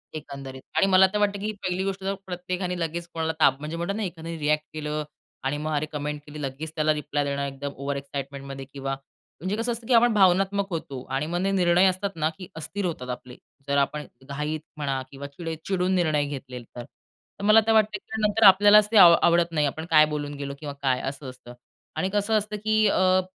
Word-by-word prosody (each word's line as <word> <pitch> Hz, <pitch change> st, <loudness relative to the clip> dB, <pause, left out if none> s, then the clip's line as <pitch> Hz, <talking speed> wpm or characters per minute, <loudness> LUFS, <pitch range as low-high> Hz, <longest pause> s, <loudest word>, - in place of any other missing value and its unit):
एकंदरीत. 135 Hz, -3 st, -8 dB, 0.2 s
आणि -, -, +5 dB
मला 190 Hz, 0 st, +6 dB
तर -, -, +1 dB
वाटतं 205 Hz, -1 st, +1 dB
की 215 Hz, +2 st, -2 dB
पहिली 185 Hz, +1 st, -1 dB
गोष्ट 195 Hz, 0 st, -3 dB
जर 195 Hz, +1 st, 0 dB
प्रत्येकाने 180 Hz, 0 st, -3 dB
लगेच 170 Hz, +1 st, -3 dB
कोणाला 160 Hz, 0 st, -1 dB
ताप 135 Hz, -3 st, +4 dB
म्हणजे 155 Hz, +3 st, -5 dB
म्हणतो 170 Hz, +4 st, -2 dB
ना, 220 Hz, -, -2 dB
एखाद्याने 165 Hz, -3 st, -5 dB
रिअ‍ॅक्ट 150 Hz, 0 st, +1 dB
केलं 150 Hz, 0 st, -3 dB, 0.4 s
आणि 135 Hz, +2 st, -1 dB
मग 155 Hz, +1 st, -3 dB
अरे 150 Hz, +1 st, 0 dB
कमेंट 150 Hz, 0 st, -4 dB
केली, 150 Hz, 0 st, -9 dB
लगेच 145 Hz, +3 st, -5 dB
त्याला 155 Hz, 0 st, +2 dB
रिप्लाय 150 Hz, -1 st, -2 dB
देणं 140 Hz, 0 st, -2 dB
एकदम 140 Hz, +1 st, -5 dB
ओव्हर 140 Hz, +1 st, -3 dB
एक्साईटमेंटमध्ये 140 Hz, 0 st, -6 dB
किंवा 135 Hz, -1 st, -3 dB, 0.5 s
म्हणजे 185 Hz, +4 st, -1 dB
कसं 230 Hz, +2 st, -1 dB
असतं 230 Hz, -1 st, -6 dB
की 255 Hz, -, +2 dB
आपण 235 Hz, 0 st, +5 dB
भावनात्मक 195 Hz, 0 st, +3 dB
होतो 140 Hz, -7 st, -5 dB
आणि 135 Hz, +3 st, 0 dB
मग 170 Hz, +3 st, -2 dB
निर्णय 185 Hz, -2 st, +3 dB
असतात 185 Hz, +2 st, -2 dB
ना, 155 Hz, -1 st, +1 dB
की 185 Hz, -, -9 dB
अस्थिर 190 Hz, +5 st, -4 dB
होतात 140 Hz, -8 st, -4 dB
आपले, 125 Hz, 0 st, -7 dB, 0.3 s
जर 140 Hz, 0 st, +1 dB
आपण 150 Hz, +2 st, 0 dB, 0.2 s
घाईत 150 Hz, +2 st, -3 dB, 0.2 s
म्हणा 135 Hz, -3 st, -1 dB
किंवा 140 Hz, +1 st, -7 dB
चिडे 165 Hz, +3 st, -6 dB
चिडून 185 Hz, -1 st, 0 dB
निर्णय 155 Hz, -5 st, +2 dB
घेतले 130 Hz, -3 st, -7 dB
तर. 120 Hz, +1 st, -10 dB
तर 170 Hz, -, -18 dB
मला 215 Hz, +2 st, +7 dB
ते -, -, +4 dB
वाटतं 215 Hz, -2 st, +3 dB
की 220 Hz, +3 st, -6 dB
नंतर 210 Hz, +1 st, +2 dB
आपल्यालाच 205 Hz, +2 st, +8 dB
ते 225 Hz, -, +4 dB
आ 195 Hz, -, +11 dB, 0.2 s
आवडत 170 Hz, 0 st, +4 dB
नाही. 150 Hz, -2 st, +1 dB
आपण 160 Hz, +3 st, -5 dB
काय 155 Hz, -1 st, +7 dB
बोलून 150 Hz, -1 st, -4 dB
गेलो 140 Hz, 0 st, -5 dB
किंवा 145 Hz, -2 st, -6 dB
काय 130 Hz, -2 st, +1 dB
असं 135 Hz, 0 st, -5 dB
असतं. 125 Hz, -1 st, -12 dB, 0.4 s
आणि 190 Hz, -, -1 dB
कसं 205 Hz, +2 st, +1 dB
असतं 210 Hz, 0 st, -3 dB
की 215 Hz, 0 st, +1 dB
अ, 185 Hz, -1 st, +3 dB
160 Hz, 210 wpm, -25 LUFS, 140-190 Hz, 0.5 s, आ